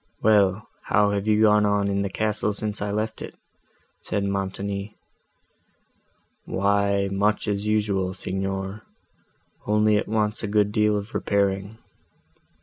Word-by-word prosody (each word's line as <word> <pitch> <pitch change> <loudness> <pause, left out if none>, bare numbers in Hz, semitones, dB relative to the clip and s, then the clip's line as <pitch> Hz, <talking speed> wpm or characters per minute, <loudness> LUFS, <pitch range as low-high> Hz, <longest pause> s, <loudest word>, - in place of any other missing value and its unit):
"Well, 105 -1 +3 0.2
how 105 0 +3
have 100 +1 -2
you 110 0 +3
gone 105 -1 +5
on 100 -1 +1
in 100 0 0
the 100 - -1
castle, 105 +1 -1
since 105 0 -3
I 105 - -2
left 110 +2 -3
it?" - - -8 0.7
said 100 - -2
Montoni. 100 +1 -3 1.5
"Why 100 0 +1
much 105 +3 +1
as 105 0 -1
usual, 100 -3 0
Signor, 95 +2 -4 0.9
only 105 0 +3
it - - -2
wants 105 0 0
a 110 - -3
good 105 0 +2
deal 105 0 +2
of 100 +3 -6
repairing. 100 +1 -1
100 Hz, 135 wpm, -24 LUFS, 100-105 Hz, 1.5 s, gone